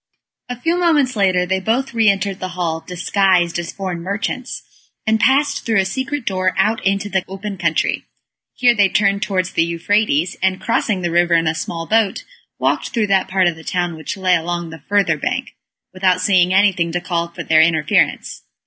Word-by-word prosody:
A 245 -1 -5
few 335 +6 0
moments 295 -8 +2
later 185 -3 +2
they 190 +1 0
both 240 +7 -1
re 225 -2 +4
entered 195 -1 -1
the 185 - -4
hall, 165 -2 -1
disguised 180 -1 +1
as 170 -1 -5
foreign 185 -3 -5
merchants, 210 +7 -4 0.4
and 220 0 +2
passed 280 +4 +2
through 225 -3 +1
a 190 - +1
secret 265 +6 -3
door, 185 -1 0
out 220 +1 +1
into 195 +1 0
the 190 -2 -1
open 195 +1 -6
country. 185 - -1 0.5
Here 245 -1 +4
they 200 -4 +3
turned 200 +1 +1
towards 185 -3 -1
the 165 - +2
Euphrates, 170 0 0
and 190 0 +1
crossing 205 -2 -1
the 175 - -1
river 175 0 +3
in 165 0 +2
a 160 - +1
small 165 +1 -5
boat, 215 0 +1 0.3
walked - - 0
through 230 -4 0
that 190 -1 +2
part 190 0 +1
of 175 -2 +1
the 160 - -13
town 175 -1 -2
which 160 +8 -6
lay 185 -1 +2
along 175 0 -3
the 160 - -11
further 200 -6 +2
bank, 250 - -3 0.4
without 185 -1 +1
seeing 185 -1 +3
anything 190 -3 +2
to 175 - 0
call 175 -1 -2
for 170 - -8
their 155 0 +4
interference. 160 -2 +1
190 Hz, 195 wpm, -18 LUFS, 175-215 Hz, 0.5 s, re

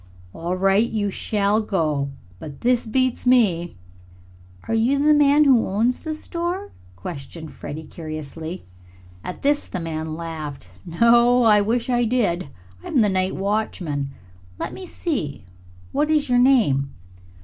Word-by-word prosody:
"All 170 +2 -3
right, 195 +4 +3
you 205 -2 -1
shall 205 +2 0
go. 155 -9 -1 0.3
But 145 -3 -9
this 245 -1 +2
beats 255 +2 0
me!" 190 -9 +3 0.9
"Are - - -1
you 235 +5 +2
the 300 +2 +4
man 295 0 +5
who 260 -5 +4
owns 225 +6 0
the 315 -1 -4
store?" 345 +5 -4 0.2
questioned 140 - -8
Freddie 155 +3 -8
curiously. 160 +2 -7 0.6
At 180 - -7
this 290 +1 +2
the 185 - -4
man 160 -1 -4
laughed. 155 - -7 0.2
"No; 235 +7 +4 0.2
wish 235 +3 0
I 245 -1 +2
did. 205 - 0 0.3
I'm 255 - +1
the 210 - +3
night 185 0 0
watchman. 185 -8 -2 0.5
Let - - -4
me 375 - -8
see, 160 - -3 0.5
what 295 +2 0
is 300 -3 +2
your 245 0 +4
name?" 220 - +3
210 Hz, 140 wpm, -22 LUFS, 160-250 Hz, 0.9 s, man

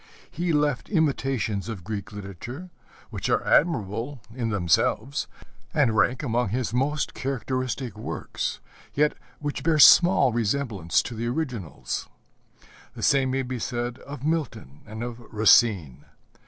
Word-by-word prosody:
He 170 +2 -1
left 145 -4 0
imitations 135 - 0
of 105 -6 -6
Greek 105 +1 -5
literature 105 - -8 0.4
which - - -3
are - - +2
admirable 125 - +1
in 120 -2 -2
themselves, 105 - +1 0.5
and 135 -8 +3
rank 125 +5 +2
among 120 -4 0
his 120 +2 -2
most 140 +4 0
characteristic 130 -3 -3
works, - - -4 0.4
yet 150 +1 +3 0.2
which 145 -1 -4
bear 165 -1 +2
small 150 0 +7
resemblance 110 -6 0
to - - -6
the 115 +1 -3
originals. 120 - -4 0.9
The - - -7
same 135 -2 +3
may 135 +1 0
be 125 -1 -4
said 120 +1 -3
of 140 -2 -9
Milton 150 - -3
and 110 +2 -6
of 120 -1 -6
Racine. 105 - +4
125 Hz, 130 wpm, -25 LUFS, 110-140 Hz, 0.9 s, small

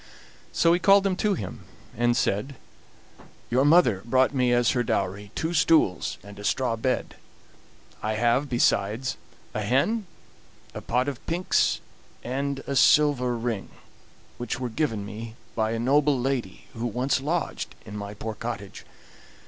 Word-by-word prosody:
So 165 0 +3
he 175 - +2
called 195 +2 +5
them 195 -2 +1
to 210 -1 +1
him, 115 - -7 0.3
and 120 +1 +2
said: 120 +8 -1 1.0
"Your 130 +3 +3
mother 145 - +5
brought 130 +3 +2
me 125 -2 +2
as 120 -1 +3
her 125 - +1
dowry 100 -2 -2
two 160 +2 -2
stools 160 - +2
and 100 0 -12
a - - -8
straw 125 +1 0
bed; 125 +3 -2 0.8
I 110 - -1
have, 120 +5 +2
besides, 120 0 +1 0.4
a 105 - -2
hen, 140 - +1 0.7
a - - -6
pot 125 +3 0
of 135 -3 -5
pinks, 175 +2 +1 0.4
and 135 +2 -3
a 140 - -3
silver 135 -4 +4
ring, 115 -4 -3 0.7
which 120 +1 -3
were 125 -1 -3
given 115 -6 -1
me 110 +2 -8 0.2
by 110 -1 +1
a 115 - -1
noble 140 +3 +3
lady 125 -6 -3
who 115 +1 -3
once 125 +4 0
lodged 160 +2 -2
in 105 - -8
my 100 0 -6
poor 110 +1 -5
cottage. - - -6
125 Hz, 150 wpm, -26 LUFS, 110-140 Hz, 1.0 s, called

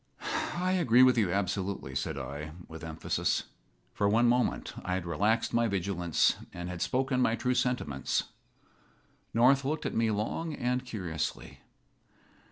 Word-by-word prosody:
"I 180 +1 0
agree 130 -10 +5
with 130 -1 +6
you 105 -7 +2
absolutely," 95 -6 -2
said 65 +1 -2
I, 70 +3 -6
with 80 0 -10
emphasis. 80 -1 -1 0.5
For 100 - +1
one 115 +3 +4
moment 125 +1 +1
I 90 - -1
had 95 -2 -3
relaxed 105 +8 +1
my 115 0 +3
vigilance, 90 -4 +1
and 90 0 -6
had 90 -1 -6
spoken 130 0 +1
my 115 -2 +3
true 125 +2 0
sentiments. 125 - 0 1.1
North 130 +4 +4
looked 150 +4 -2
at - - -2
me 115 0 +2
long 125 +10 -2
and 125 0 -1
curiously. 85 - -4
105 Hz, 145 wpm, -30 LUFS, 85-125 Hz, 1.1 s, with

